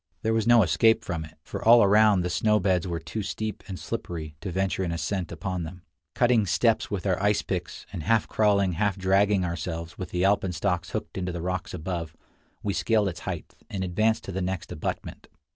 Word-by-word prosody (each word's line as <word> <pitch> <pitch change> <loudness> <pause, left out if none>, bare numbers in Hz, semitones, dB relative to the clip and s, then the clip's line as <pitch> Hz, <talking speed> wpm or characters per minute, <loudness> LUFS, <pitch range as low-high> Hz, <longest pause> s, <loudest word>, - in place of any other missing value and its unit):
There 110 - +1
was 115 0 +1
no 120 -2 +7
escape 110 +5 +3
from 85 -2 -3
it, 80 0 -16
for - - -6
all 115 0 +8
around 105 -1 +5
the 90 - -1
snow 105 +4 +3
beds 95 -2 +1
were 85 -1 -2
too 80 +7 -5
steep 110 +2 -4
and 95 -2 -5
slippery 80 -4 -5
to 95 - -4
venture 95 +1 0
an 85 - -2
ascent 85 +2 -2
upon 90 +2 -3
them. 85 +2 -8 0.3
Cutting 120 -4 +3
steps 115 +5 +2
with 100 -3 -3
our 95 -1 +1
ice 105 +1 +2
picks, 90 -2 -4
and 85 - -4
half 115 +6 +2
crawling, 100 -3 +2
half 100 +3 0
dragging 95 0 +3
ourselves, 85 0 -5
with 90 -2 -5
the 90 0 -1
alpenstocks 90 -2 +1
hooked - - -4
into 90 -1 -2
the 85 -1 -5
rocks 90 -1 -3
above, 85 -2 -5 0.5
we 100 - 0
scaled 105 -1 +2
its 90 - -7
height, - - -6 0.2
and 95 -1 -3
advanced 110 +5 +1
to - - -6
the 95 +1 -3
next 90 -1 -3
abutment. - - -5
95 Hz, 205 wpm, -26 LUFS, 85-105 Hz, 0.5 s, all